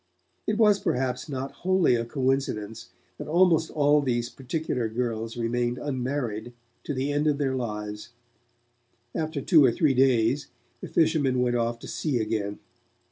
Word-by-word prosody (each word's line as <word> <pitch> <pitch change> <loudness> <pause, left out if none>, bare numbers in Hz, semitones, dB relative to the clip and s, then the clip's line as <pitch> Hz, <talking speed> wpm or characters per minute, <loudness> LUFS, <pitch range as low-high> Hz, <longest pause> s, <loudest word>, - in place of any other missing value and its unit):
It 210 - +1
was, 210 -3 +5
perhaps, 130 -1 -1
not 135 -1 -4
wholly 185 -6 +3
a 115 -1 0
coincidence 130 -5 -2 0.3
that - - -6
almost 165 0 +3
all 145 0 +3
those 120 -3 -1
particular 130 -3 -3
girls 115 -1 -3
remained 120 +1 -1
unmarried 125 -5 -3 0.3
to 145 - -3
the 135 +3 -1
end 145 +1 +1
of 145 -2 +2
their 135 -2 0
lives. 105 -3 -5 1.0
After 155 -2 -2
two 155 0 +5
or 130 - +5
three 145 +3 +2
days, 130 +1 +2 0.3
the - - -7
fishermen 150 -6 +2
went 125 -1 +1
off 115 0 0
to - - -11
sea 150 -6 -1
again. 105 -2 -2
130 Hz, 150 wpm, -26 LUFS, 120-150 Hz, 1.0 s, was